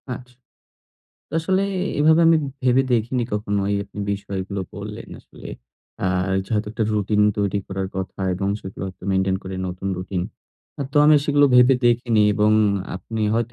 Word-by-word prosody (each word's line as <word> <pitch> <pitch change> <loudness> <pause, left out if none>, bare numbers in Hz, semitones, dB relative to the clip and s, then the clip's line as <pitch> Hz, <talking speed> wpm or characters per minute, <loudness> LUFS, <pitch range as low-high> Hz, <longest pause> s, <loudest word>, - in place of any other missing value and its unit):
আচ্ছা। 125 +1 -13 1.0
আসলে 190 +4 +1 0.4
এভাবে 160 +2 +5
আমি 165 0 +6 0.3
ভেবে 130 +1 +4
দেখিনি 120 +2 +1
কখনো 105 -1 -1
এই - - +1
আ - - -13 0.3
বিষয়গুলো 100 0 -4
বললেন - - -8
আসলে। - - -13 0.6
আর 90 +1 0
যে - - -19
হয়তো 105 0 -1
একটা 115 -1 -1
রুটিন 105 0 +1 0.2
তৈরি 100 0 0
করার 95 0 -4
কথা 95 0 -5
এবং 95 +2 -2
সেগুলো 95 0 -8
হয়তো 95 - -10
মেইনটেইন 95 0 +1
করে 95 0 -6
নতুন 90 +2 -5
রুটিন। 90 -1 -3 0.6
আ - - +1
তো - - -4
আমি 155 +1 +7
সেগুলো 145 0 +4
ভেবে 125 +1 +7
দেখিনি 120 -2 +3
এবং 105 0 +3 0.5
আপনি 110 +3 -5
হয়তো 120 +1 -1
105 Hz, 160 wpm, -22 LUFS, 95-125 Hz, 1.0 s, আমি